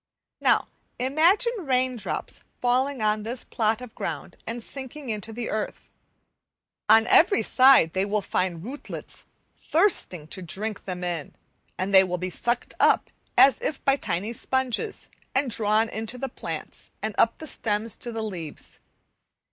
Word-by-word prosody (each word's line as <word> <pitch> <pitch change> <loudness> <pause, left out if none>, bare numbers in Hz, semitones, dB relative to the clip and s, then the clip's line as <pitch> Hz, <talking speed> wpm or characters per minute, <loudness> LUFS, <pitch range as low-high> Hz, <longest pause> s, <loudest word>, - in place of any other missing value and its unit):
Now, - - +3 0.3
imagine 335 - +3
rain 260 -5 +1
drops 230 - -4 0.2
falling 255 0 +1
on 215 0 +2
this 235 +4 -3
plot 220 +1 0
of 250 -3 -9
ground - - -5
and 230 +1 -4
sinking 270 0 -7
into 215 +1 -3
the 230 +1 -4
earth. 215 -1 -4 1.0
On 220 +1 +7
every 365 - +5
side 255 -11 +6
they 190 - +1
will 205 0 0
find 175 -3 -1
rootlets 265 +7 -7 0.3
thirsting 320 - +1
to 185 - -3
drink 200 +5 -4
them 180 -1 -5
in, 170 -4 -4 0.4
and 190 +2 -2
they 190 0 +9
will 180 -1 -2
be 185 +1 -4
sucked 240 +6 -2
up - - +3 0.3
as 275 - +6
if 295 - -3
by 275 - +5
tiny 210 -4 -3
sponges, 260 - -1 0.3
and 265 -1 +1
drawn 215 +1 +2
into 225 +3 -4
the 270 +2 -3
plants, - - -7
and 215 0 -1
up 230 - +4
the 315 - -8
stems 220 -5 -1
to 240 - -5
the 225 -1 -3
leaves. 175 -8 -7
225 Hz, 155 wpm, -25 LUFS, 205-260 Hz, 1.0 s, they